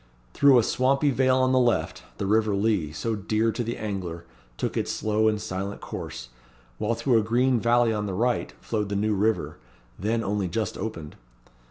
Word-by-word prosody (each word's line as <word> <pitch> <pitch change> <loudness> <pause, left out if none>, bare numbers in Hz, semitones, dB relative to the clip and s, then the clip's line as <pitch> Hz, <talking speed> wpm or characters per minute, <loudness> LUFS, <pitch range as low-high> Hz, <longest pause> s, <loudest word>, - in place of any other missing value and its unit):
Through 140 -2 +6
a 120 - +5
swampy 135 +5 +2
vale 130 0 +3
on 130 0 +2
the 130 - +4
left, 120 -2 +1 0.2
the 100 - -3
river 105 0 +2
Lea, 100 -7 0
so 115 +8 -2
dear 110 +2 0
to 120 +2 -3
the 115 +1 -4
angler, 90 -5 -5 0.3
took - - -2
its - - -1
slow 110 0 +1
and 105 -1 +1
silent 100 0 -4
course; - - -7 0.5
while 115 +2 0
through 115 0 +2
a - - 0
green 120 +3 +2
valley 120 0 +3
on 105 -1 -2
the 95 - -3
right, 120 +4 0
flowed 105 -3 -2
the 100 - -2
New 105 +2 +1
River, 105 +2 0 0.4
then 115 +4 0
only 100 -1 -1
just 105 +3 -2
opened. 90 -8 -6
110 Hz, 190 wpm, -26 LUFS, 100-120 Hz, 0.5 s, Through